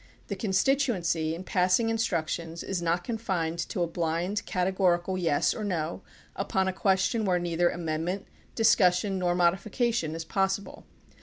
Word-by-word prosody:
The 200 - -2
con 200 +2 -3
stituency 190 - +1
in 175 - -7
passing 185 +5 +2
instructions 170 -6 -2
is 190 -3 -3
not 170 +1 0
confined 185 -8 -2
to 180 - -1
a - - 0
blind, 170 +4 -1
categorical 185 -1 +1
"yes" 165 -6 +1
or 215 - -5
"no" 170 -3 -2 0.3
upon 190 -1 0
a 190 - 0
question 190 +4 +1
where 185 -3 +2
neither 175 0 +1
amendment, 170 +3 -3 0.3
discussion, 195 -3 +3
nor 175 -1 +1
modifica 195 +7 +1
tion 160 -8 -2
is 165 0 -5
possible. 195 +2 -2
180 Hz, 150 wpm, -28 LUFS, 170-195 Hz, 0.3 s, discussion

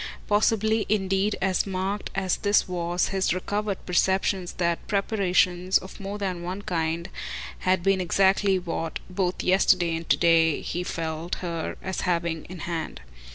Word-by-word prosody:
Possibly 220 +1 +2
indeed 195 0 +1
as 190 +1 +1
marked 195 +2 -2
as 190 -2 0
this 205 0 +2
was 175 -1 -1
his 190 -2 +1
recovered 205 +2 -3
perception 190 +1 +1
that 170 -1 -1
preparations, 185 -3 +2
of 190 - -9
more 200 +1 -5
than 185 -4 -3
one 185 +3 -5
kind, 165 -1 -1 0.5
had 185 -1 +1
been 195 -1 +3
exactly 195 +2 +3
what, 165 -2 -3
both 180 -1 -1
yesterday 185 -2 +3
and 165 0 -6
to - - +5
day, 165 -2 +4
he 175 - -3
felt 165 0 -3
her 165 -2 -3
as 190 0 -3
having 170 -3 -1
in 180 -2 -9
hand. 160 - -4
185 Hz, 150 wpm, -26 LUFS, 170-195 Hz, 0.5 s, to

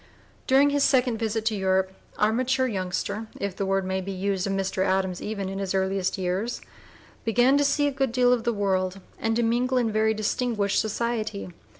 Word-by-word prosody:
During 275 +2 +5
his 285 -1 +2
second 250 -4 +3
visit 225 -1 -1
to 220 -1 +1
Europe, 190 -1 +1 0.3
our 215 +1 +3
mature 260 +2 +1
youngster 200 0 -3
if 200 -2 -3
the 195 - -2
word 195 0 +1
may 190 0 -1
be 195 +1 -5
used 195 0 -1
of 195 - -1
Mr. 195 -1 -1
Adams 190 -1 0
even 205 -2 -3
in 195 +1 -4
his 195 -1 -2
earliest 190 0 0
years 190 +5 -2 0.6
began 245 +4 +4
to - - +3
see 285 +1 +2
a 285 - +1
good 270 -2 -1
deal 250 0 +4
of 240 -2 0
the 235 - +1
world 190 -3 0 0.2
and 225 0 0
to 235 - +1
mingle 245 +3 +1
in 235 -3 +1
very 220 +1 +2
distinguished 215 -1 0
society. 220 -2 -2
215 Hz, 200 wpm, -26 LUFS, 195-240 Hz, 0.6 s, During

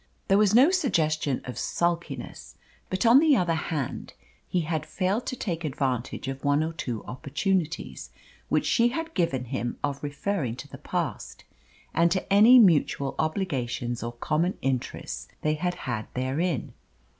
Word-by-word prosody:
There 195 - +5
was 210 0 +4
no 270 +8 +7
suggestion 155 - +1
of 125 - -6
sulkiness, 170 0 -3 0.3
but 185 +4 -1
on 235 +4 +8
the 305 -2 +5
other 175 -3 +1
hand 155 -4 -3 0.3
he 180 - 0
had 160 -1 -2
failed 195 +5 -1
to - - -2
take 170 -8 -3
advantage 130 -3 -2
of 135 0 -5
one 145 +1 +3
or 160 +1 -3
two 120 -8 -4
opportunities 155 - -2 0.4
which - - +2
she 235 0 +4
had 325 +6 -3
given 135 -8 0
him 120 -1 -3
of 140 -1 -2
referring 145 - -2
to 140 - -9
the - - -11
past - - -4 0.5
and 170 +1 +4
to 190 +2 -1
any 220 +5 +8
mutual 160 - +4
obligations 130 - -2
or 120 0 -4
common 155 +9 0
interests 130 -2 -3 0.2
they 155 - +2
had 180 +3 -1
had 115 -4 -3
therein. 135 +3 -1
155 Hz, 155 wpm, -27 LUFS, 135-190 Hz, 0.5 s, on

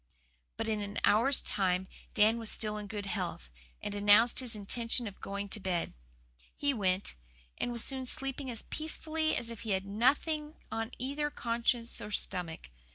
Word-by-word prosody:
But 225 0 -2
in 215 -1 0
an 205 0 -5
hour's 255 +6 +5
time 190 -1 +2 0.3
Dan 220 +2 +5
was 225 -2 +1
still 210 -1 +1
in 210 -1 -5
good 205 -1 -4
health, 180 - -3 0.3
and - - -3
announced 205 +3 +6
his 245 -3 -1
intention 230 +4 0
of 200 -3 -8
going 200 +1 -3
to 215 - -3
bed. 180 -3 -1 0.6
He 285 -1 +1
went, 190 -4 0 0.5
and 245 - 0
was 235 -1 -2
soon 265 -2 -3
sleeping 270 +1 -3
as 230 -3 -4
peacefully 315 0 -2
as 235 - -3
if 230 - -7
he 220 -3 -1
had 190 - -7
nothing 295 +9 +1 0.2
on 225 0 -2
either 285 +4 -1
conscience 235 -2 0
or 210 - -5
stomach. 175 - -1
225 Hz, 170 wpm, -32 LUFS, 200-255 Hz, 0.6 s, announced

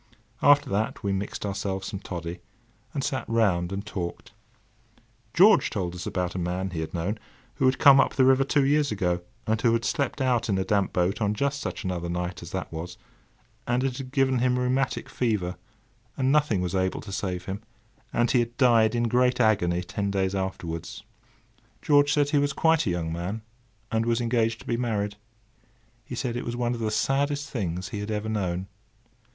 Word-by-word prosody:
After 145 0 +5
that, 105 +3 -1
we 100 -1 0
mixed 100 +2 -3
ourselves 95 -1 -3
some 100 - -5
toddy, 85 -3 -6 0.5
and 140 - -3
sat 135 -1 -1
round 95 -6 +2
and 100 +1 -4
talked. 90 -5 -5 1.0
George 200 - +6
told 90 -5 -3
us 90 -1 -6
about 90 -2 -2
a 95 - -3
man 90 +2 -2
he 85 - -4
had 80 - -4
known, 95 +6 -2 0.4
who 130 - +3
had 130 - +2
come 140 -2 +8
up - - +2
the 130 - +4
river 135 +1 +5
two 140 0 +2
years 145 0 +2
ago 90 -4 0 0.2
and 110 0 0
who 115 - +3
had 115 0 0
slept 140 0 -1
out 125 -4 +1
in 95 - +2
a 95 - +1
damp 100 -2 +1
boat 90 +5 0
on 105 0 +1
just 140 +4 -1
such - - -4
another 90 -3 -3
night 90 +1 -3
as 85 - -8
that 95 -2 -5
was, 85 +2 -6 0.7
and 120 +2 +1
it 130 -1 -2
had 130 -1 -7
given 135 -2 +2
him 125 0 +2
rheumatic 125 +1 0
fever, 105 -7 -1 0.6
and 135 -1 +2
nothing 145 -10 +2
was 90 0 -2
able 95 -1 0
to 100 - -9
save 90 -2 -3
him, 100 +2 -5 0.5
and 120 0 +2
he 125 - +4
had 120 0 -2
died 115 -4 +4
in 120 - +1
great 125 +2 +2
agony 90 -6 +2
ten 100 +3 -3
days 95 -1 0
afterwards. 90 -4 -4 0.8
George 145 0 +4
said 145 -1 +2
he 145 - +4
was 140 0 +1
quite 160 -5 +3
a - - +2
young 85 -2 -2
man, 95 +6 -4 0.5
and 115 +1 0
was 115 0 +2
engaged 115 -1 +1
to - - -14
be 120 - -1
married. 105 -4 -1 0.9
He 125 - -7
said 120 -1 -2
it 120 - -3
was 120 - -4
one 120 0 0
of 120 - -5
the 110 -1 0
saddest 140 +5 0
things 90 -5 -3
he 105 - -5
had 105 +1 -5
ever 105 0 -2
known. 95 -4 -1
110 Hz, 200 wpm, -26 LUFS, 95-130 Hz, 1.0 s, come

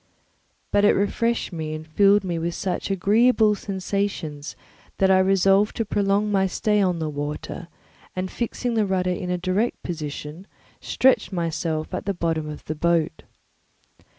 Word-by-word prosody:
But 205 - +3
it 205 - +6
refreshed 230 +2 0
me 155 -2 -4
and 155 0 -7
filled 200 +5 +4
me 175 -3 -2
with 170 +1 -2
such 190 0 -3
agreeable 215 +3 +4
sensations 190 -7 -3 0.4
that 190 0 +4
I 190 - +5
resolved 195 +2 +3
to 225 - -1
prolong 205 +1 +1
my 190 -1 +2
stay 210 +3 +1
on 180 -3 +1
the 160 -1 -2
water, 150 +3 -5 0.5
and 185 0 -3
fixing 240 +1 -2
the 220 -3 +1
rudder 185 -1 0
in 180 0 -4
a 180 - 0
direct 185 +6 -1
position, 155 +1 -6 0.3
stretched 260 -3 +2
myself 165 -3 -2
at - - -3
the 200 -1 -1
bottom 160 -3 -1
of 150 - -9
the 155 - -3
boat. 165 0 0
185 Hz, 155 wpm, -24 LUFS, 165-205 Hz, 0.5 s, it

